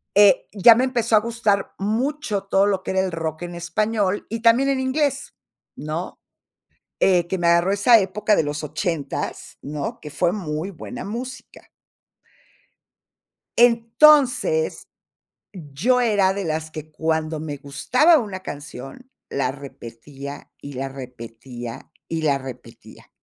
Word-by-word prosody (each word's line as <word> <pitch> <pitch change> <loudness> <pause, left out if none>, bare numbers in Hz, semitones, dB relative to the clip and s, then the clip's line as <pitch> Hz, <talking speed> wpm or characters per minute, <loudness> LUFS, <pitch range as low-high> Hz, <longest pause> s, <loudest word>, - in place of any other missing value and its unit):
eh, 205 -1 +5
ya 215 +3 +7
me 245 - +2
empezó 235 -4 +1
a - - +7
gustar 215 -3 0
mucho 220 +1 -1
todo 195 0 +2
lo 195 -2 0
que - - -3
era 190 - +1
el 190 -1 0
rock 160 0 -4
en 175 0 -6
español, 205 +4 -1
y 230 0 -4
también 240 +4 +4
en 270 -1 +1
inglés, 280 +2 -1 0.4
¿no? 155 +4 -5 0.8
Eh, 175 -2 +3
que 190 - -2
me 170 - 0
agarró 170 +2 +4
esa 215 +4 +6
época 210 +2 +1
de - - +3
los 150 0 -4
80, 155 -1 -4
¿no?, 145 0 -5
que 150 - -9
fue 175 +4 +1
muy 170 -2 -4
buena 245 +7 -8
música. 245 +6 -8 1.9
Entonces, 265 - +4 0.6
yo 180 - 0
era 205 -5 +3
de 200 -2 -4
las 155 0 -3
que 155 0 -8
cuando 160 0 -2
me 150 -2 -5
gustaba 250 - +3
una 205 -8 -4
canción, 145 - -9 0.2
la 135 -2 -1
repetía, 140 +1 -10
y 140 - -8
la 135 +1 -3
repetía, 120 -2 -9 0.2
y 165 -1 -3
la 145 -3 +2
repetía. 130 -2 -12
185 Hz, 140 wpm, -22 LUFS, 150-230 Hz, 1.9 s, ya